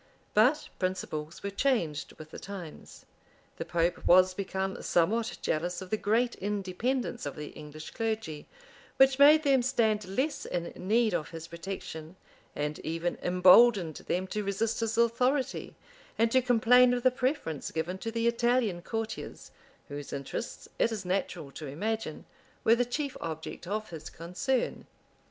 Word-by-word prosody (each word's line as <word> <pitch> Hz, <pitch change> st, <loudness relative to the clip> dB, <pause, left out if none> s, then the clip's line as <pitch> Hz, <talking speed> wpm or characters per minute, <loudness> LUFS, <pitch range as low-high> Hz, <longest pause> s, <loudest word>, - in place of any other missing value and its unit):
But 250 Hz, +9 st, +3 dB
principles 170 Hz, -4 st, -3 dB
were 200 Hz, -, -3 dB
changed 195 Hz, -, 0 dB
with 155 Hz, 0 st, -12 dB
the -, -, -8 dB
times: 185 Hz, -6 st, -9 dB, 0.5 s
the -, -, -4 dB
pope 170 Hz, 0 st, 0 dB
was 185 Hz, +1 st, +6 dB
become 190 Hz, 0 st, -3 dB
somewhat 220 Hz, +7 st, +1 dB
jealous 175 Hz, +3 st, -1 dB
of 185 Hz, -1 st, -9 dB
the -, -, +3 dB
great 230 Hz, +4 st, +1 dB
independence 210 Hz, +6 st, -2 dB
of -, -, -5 dB
the 150 Hz, -1 st, -6 dB
English 155 Hz, +1 st, -10 dB
clergy, 220 Hz, -9 st, -3 dB, 0.5 s
which 270 Hz, 0 st, +5 dB
made 300 Hz, +2 st, +8 dB
them 275 Hz, -3 st, +4 dB
stand 220 Hz, -5 st, +1 dB
less 265 Hz, +10 st, -1 dB
in 175 Hz, -1 st, -2 dB
need 220 Hz, +3 st, +2 dB
of 155 Hz, -3 st, -1 dB
his 165 Hz, -1 st, -8 dB
protection, 170 Hz, -1 st, -7 dB, 0.4 s
and 150 Hz, +1 st, -2 dB
even 165 Hz, +2 st, -2 dB
imboldened 180 Hz, -1 st, +6 dB
them 185 Hz, +1 st, 0 dB
to 210 Hz, +2 st, -3 dB
resist 210 Hz, +3 st, -1 dB
his 225 Hz, -1 st, -1 dB
authority, 250 Hz, +4 st, +1 dB, 0.4 s
and 230 Hz, +1 st, +3 dB
to 260 Hz, -, +5 dB
complain 245 Hz, +1 st, +5 dB
of 245 Hz, -, -3 dB
the 255 Hz, -, +5 dB
preference 250 Hz, -, -2 dB
given 170 Hz, +4 st, -3 dB
to 225 Hz, -, -4 dB
the 230 Hz, 0 st, 0 dB
Italian 235 Hz, -5 st, +1 dB
courtiers, 225 Hz, +3 st, -5 dB, 0.4 s
whose 145 Hz, -1 st, -7 dB
interests, 140 Hz, -, -5 dB
it 230 Hz, -, +3 dB
is 210 Hz, -4 st, -4 dB
natural 180 Hz, -5 st, -2 dB
to 150 Hz, +1 st, -8 dB
imagine, 215 Hz, +11 st, -3 dB, 0.4 s
were 225 Hz, -, +6 dB
the 245 Hz, +1 st, +2 dB
chief 280 Hz, +3 st, -3 dB
object 160 Hz, +1 st, -6 dB
of 215 Hz, +1 st, -3 dB
his 160 Hz, -2 st, -7 dB
concern. 180 Hz, +10 st, -2 dB
200 Hz, 150 wpm, -29 LUFS, 170-235 Hz, 0.5 s, made